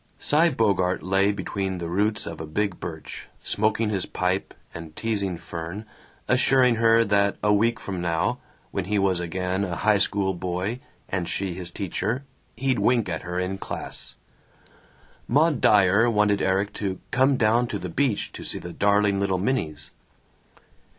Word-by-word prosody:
Cy 160 Hz, +4 st, +3 dB
Bogart 100 Hz, -, +1 dB
lay 95 Hz, +2 st, +3 dB
between 95 Hz, -1 st, -3 dB
the 85 Hz, -1 st, -4 dB
roots 105 Hz, +5 st, 0 dB
of 85 Hz, -1 st, -6 dB
a 80 Hz, -, -6 dB
big 100 Hz, +4 st, -1 dB
birch, 80 Hz, -3 st, -7 dB, 0.2 s
smoking 110 Hz, +1 st, +1 dB
his 95 Hz, -4 st, -1 dB
pipe 90 Hz, +1 st, -1 dB, 0.2 s
and 80 Hz, -2 st, -9 dB
teasing 100 Hz, -5 st, -1 dB
Fern, 85 Hz, +5 st, -6 dB, 0.4 s
assuring 125 Hz, -1 st, +4 dB
her 115 Hz, 0 st, +5 dB
that 100 Hz, -2 st, +2 dB
a 105 Hz, 0 st, +4 dB
week 115 Hz, +3 st, +2 dB
from 95 Hz, -5 st, -5 dB
now, 85 Hz, -1 st, 0 dB, 0.3 s
when 95 Hz, -, -2 dB
he 105 Hz, +2 st, 0 dB
was 95 Hz, -3 st, +2 dB
again 90 Hz, +2 st, -2 dB
a 90 Hz, -3 st, -2 dB
high 105 Hz, +1 st, +3 dB
school 95 Hz, 0 st, +1 dB
boy 90 Hz, +6 st, -3 dB, 0.3 s
and 90 Hz, -2 st, -2 dB
she 95 Hz, -2 st, -2 dB
his 90 Hz, 0 st, -7 dB
teacher, 100 Hz, +7 st, -2 dB, 0.3 s
he'd 130 Hz, -1 st, +1 dB
wink 120 Hz, -6 st, +2 dB
at 80 Hz, -2 st, -3 dB
her 90 Hz, 0 st, -5 dB
in 95 Hz, +1 st, -2 dB
class. -, -, -6 dB, 1.1 s
Maud 150 Hz, 0 st, +3 dB
Dyer 105 Hz, +3 st, +5 dB
wanted 105 Hz, -2 st, +2 dB
Erik 95 Hz, +2 st, +1 dB
to 95 Hz, -2 st, -2 dB
"come 130 Hz, +1 st, +3 dB
down 115 Hz, +2 st, +3 dB
to -, -, -3 dB
the -, -, -5 dB
beach 135 Hz, -7 st, 0 dB
to -, -, -9 dB
see -, -, -4 dB
the 90 Hz, -1 st, -7 dB
darling 100 Hz, -1 st, +2 dB
little 100 Hz, -1 st, +1 dB
minnies." 90 Hz, -, -2 dB
100 Hz, 165 wpm, -25 LUFS, 90-110 Hz, 1.1 s, her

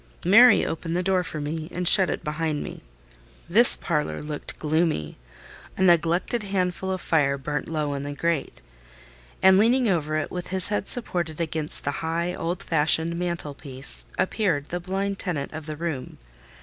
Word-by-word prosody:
Mary 230 Hz, +7 st, +7 dB
opened 165 Hz, +1 st, -3 dB
the 180 Hz, -, -1 dB
door 190 Hz, 0 st, +2 dB
for 155 Hz, -, -5 dB
me, 155 Hz, +2 st, -4 dB
and 180 Hz, 0 st, -1 dB
shut 185 Hz, 0 st, +8 dB
it -, -, -3 dB
behind 150 Hz, -1 st, -2 dB
me. -, -, -9 dB, 0.7 s
This -, -, +7 dB
parlour 75 Hz, +5 st, -2 dB
looked 150 Hz, -1 st, -5 dB
gloomy: 155 Hz, -, -1 dB, 0.6 s
a 190 Hz, -, +1 dB
neglected 175 Hz, +5 st, +2 dB
handful 190 Hz, -2 st, -2 dB
of 185 Hz, -, -2 dB
fire 145 Hz, -5 st, +1 dB
burnt 145 Hz, +2 st, -4 dB
low 150 Hz, -3 st, -2 dB
in 140 Hz, -, -4 dB
the 145 Hz, 0 st, -6 dB
grate; 165 Hz, 0 st, -2 dB, 0.8 s
and, 190 Hz, 0 st, +7 dB
leaning 240 Hz, +3 st, +3 dB
over 155 Hz, -5 st, 0 dB
it, 155 Hz, -, -3 dB
with 180 Hz, -1 st, -5 dB
his 190 Hz, 0 st, +3 dB
head 205 Hz, -1 st, -2 dB
supported 175 Hz, -10 st, -3 dB
against 160 Hz, -2 st, -3 dB
the 145 Hz, -, -1 dB
high, 170 Hz, +2 st, -2 dB
old 170 Hz, +1 st, -4 dB
fashioned 160 Hz, +1 st, +1 dB
mantelpiece, 140 Hz, -, -5 dB
appeared 180 Hz, -8 st, 0 dB
the 175 Hz, -, -3 dB
blind 195 Hz, +2 st, -3 dB
tenant 155 Hz, -7 st, -3 dB
of 155 Hz, 0 st, -8 dB
the 155 Hz, -1 st, -6 dB
room. 160 Hz, -6 st, -5 dB
165 Hz, 165 wpm, -24 LUFS, 150-180 Hz, 0.8 s, shut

